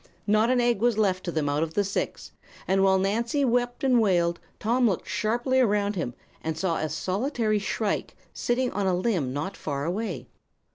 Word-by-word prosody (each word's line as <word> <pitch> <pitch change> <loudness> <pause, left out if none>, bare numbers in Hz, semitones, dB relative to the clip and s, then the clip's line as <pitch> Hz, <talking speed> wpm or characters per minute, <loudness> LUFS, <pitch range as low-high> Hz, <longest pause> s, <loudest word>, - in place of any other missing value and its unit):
Not 215 +2 +3
an 255 -1 +3
egg 240 -3 +2
was 240 -2 +2
left 190 -4 +1
to 175 - -2
them 155 -3 -1
out 145 +1 0
of 160 0 -2
the 205 - +3
six, 195 0 -3 0.4
and 195 0 +3
while 190 0 +5
Nancy 230 +8 +1
wept 245 0 0
and 255 -3 +4
wailed 170 -4 +2 0.2
Tom 240 +2 +2
looked 185 - -3
sharply 240 +4 0
around 205 -4 +2
him 140 -10 -3 0.3
and 160 -1 -2
saw 165 -1 0
a 155 - -2
solitary 215 - 0
shrike 205 +1 -2 0.2
sitting 250 +1 0
on 200 -1 -1
a 185 - +2
limb 180 - 0
not 145 +8 -3
far 140 -2 -3
away." 180 - -3
205 Hz, 190 wpm, -26 LUFS, 175-235 Hz, 0.4 s, while